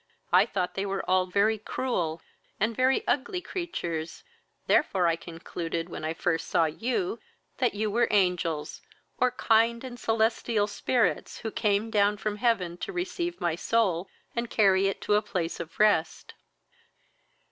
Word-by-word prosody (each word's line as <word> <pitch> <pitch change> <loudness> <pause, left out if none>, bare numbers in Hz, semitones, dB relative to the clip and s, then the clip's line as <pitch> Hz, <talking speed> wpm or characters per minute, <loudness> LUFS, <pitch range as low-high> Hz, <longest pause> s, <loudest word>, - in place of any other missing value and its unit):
I - - +6
thought 180 -2 -2
they 195 - -2
were 195 0 -3
all 185 0 +3
very 205 +4 +2
cruel 175 -9 -2 0.4
and 220 +2 +1
very 260 +2 +2
ugly 285 +6 0
creatures, 175 - -4 0.4
therefore 190 - +3
I 165 -1 +3
concluded, 165 0 -5
when 165 - -7
I 160 +1 -2
first 165 0 -1
saw 165 - +3
you, 255 - -2 0.4
that 245 -5 +1
you 215 0 -1
were 235 +3 +3
angels, 180 -6 0 0.4
or 255 - +4
kind 230 0 +2
and 245 -2 -8
celestial 225 -1 +1
spirits, 220 +3 0
who 220 - -4
came 210 +1 0
down 205 -1 +3
from 210 0 -3
heaven 200 -7 +1
to 400 - -5
receive 355 -1 -3
my 170 -2 0
soul, 190 -1 0 0.3
and 235 0 -2
carry 195 -2 +4
it 195 - -3
to - - 0
a 210 - +4
place 180 -5 -3
of 170 -1 -8
rest." 175 -6 +2
205 Hz, 155 wpm, -28 LUFS, 175-235 Hz, 0.4 s, I